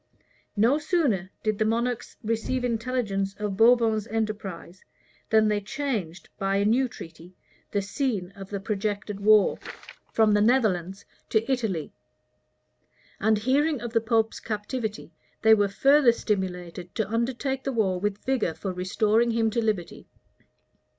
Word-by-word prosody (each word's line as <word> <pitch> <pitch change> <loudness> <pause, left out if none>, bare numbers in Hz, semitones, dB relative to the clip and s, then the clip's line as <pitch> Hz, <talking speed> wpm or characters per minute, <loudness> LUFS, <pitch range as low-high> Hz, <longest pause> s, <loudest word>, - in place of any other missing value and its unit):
No 240 +8 +4
sooner 285 - 0
did 215 -1 -1
the - - +3
monarchs 235 +2 -1
receive 230 +3 -1
intelligence 225 -5 -1
of 210 -2 -3
Bourbon's 225 -1 +4
enterprise 210 -5 -4 0.5
than 220 -1 +4
they 210 -1 +1
changed, 210 - -4
by 195 -1 0
a 200 +1 +2
new 250 +5 +3
treaty, 165 -4 -12 0.3
the 200 -1 -1
scene 200 -3 -2
of 195 -1 -10
the 200 - -3
projected 205 0 -3
war 210 0 +4 0.5
from 220 -1 +3
the 205 0 +3
Netherlands 200 -6 +1 0.2
to 225 +4 +1
Italy; 215 - -2 1.3
and 220 +1 +3
hearing 275 +6 +1
of 235 -1 -6
the 230 - +3
pope's 225 -1 +1
captivity, 215 -2 -4 0.3
they 220 0 +7
were 205 -2 +3
further 270 +5 +5
stimulated 180 -5 -4
to 220 -3 -1
undertake 255 +4 -2
the 270 - -2
war 195 -7 0
with 205 +1 -3
vigor 250 -11 0
for 190 -2 -4
restoring 210 +6 +1
him 225 -1 +1
to 235 - 0
liberty. 210 -6 -3
215 Hz, 140 wpm, -26 LUFS, 195-235 Hz, 1.3 s, they